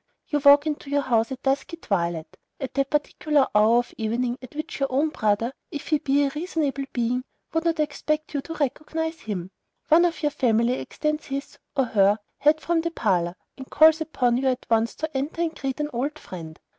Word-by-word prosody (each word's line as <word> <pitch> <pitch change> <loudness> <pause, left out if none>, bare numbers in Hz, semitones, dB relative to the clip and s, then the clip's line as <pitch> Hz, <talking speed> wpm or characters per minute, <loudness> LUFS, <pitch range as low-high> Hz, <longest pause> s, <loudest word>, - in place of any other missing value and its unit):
You 295 - 0
walk 285 +1 +7
into 295 -2 -3
your 285 0 +1
house 230 -1 +1
at 265 0 -6
dusky 275 +5 0
twilight, 170 - -2 0.2
at 265 -2 -5
that 275 -1 0
particular 295 -1 +1
hour 215 +3 +5
of 245 0 -1
evening 240 +3 -1
at 255 +2 -12
which 310 0 -5
your 275 -1 0
own 285 +5 +2
brother, 215 -2 0 0.2
if 290 - -7
he 305 -2 +3
be 285 -1 +2
a 275 - -1
reasonable 300 -4 -2
being, 245 +1 0 0.3
would 325 +1 0
not 330 -1 +1
expect 305 0 -1
you 285 - -1
to 325 +3 -7
recognize 320 +3 -2
him; 190 -4 -5 0.4
one 330 +3 +6
of 335 -2 -2
your 295 - +2
family 240 -4 +2
extends 305 +3 -2
his 275 +1 -5 0.2
(or 270 - +3
her) 205 -2 +3 0.2
head 300 +2 +4
from 335 -1 +1
the 335 - -1
parlor, 180 - 0 0.2
and 265 - -9
calls 315 +1 +6
upon 250 -6 +1
you 265 +1 0
at 255 -1 0
once 225 +1 +2
to 315 -2 -5
enter, 295 +5 -1
and 325 -1 -2
greet 270 0 -4
"an 300 0 -2
old 280 +6 -2
friend." 165 - -9
275 Hz, 205 wpm, -25 LUFS, 235-305 Hz, 0.4 s, walk